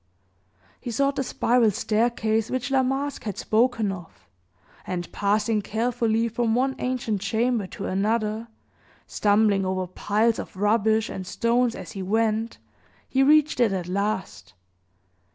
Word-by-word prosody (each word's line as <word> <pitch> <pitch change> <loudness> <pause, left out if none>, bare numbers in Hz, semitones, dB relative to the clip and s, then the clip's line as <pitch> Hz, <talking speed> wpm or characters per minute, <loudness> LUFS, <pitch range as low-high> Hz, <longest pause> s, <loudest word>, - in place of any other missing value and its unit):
He - - -6
sought 275 +4 +1
the 270 - +1
spiral 240 -2 +2
staircase 220 +1 0
which 255 +1 -2
La 265 -1 +4
Masque 270 +1 -2
had 205 -4 -4
spoken 225 -2 +1
of, 160 - -11 0.6
and, 175 -1 -4
passing 210 +2 +1
carefully 230 +1 0
from 230 0 0
one 265 +2 +1
ancient 240 -5 -2
chamber 220 +1 0
to - - -7
another, 215 +3 -1 0.6
stumbling 205 -1 +2
over 185 0 -1
piles 215 +5 0
of - - -7
rubbish 220 +2 +2
and 185 -1 -6
stones 235 +3 +1
as - - -8
he 195 - -6
went, 220 +3 0 0.5
he 265 - +1
reached 300 0 +4
it 235 -4 +4
at 180 -2 -3
last. 190 - -3
220 Hz, 135 wpm, -25 LUFS, 200-240 Hz, 0.6 s, La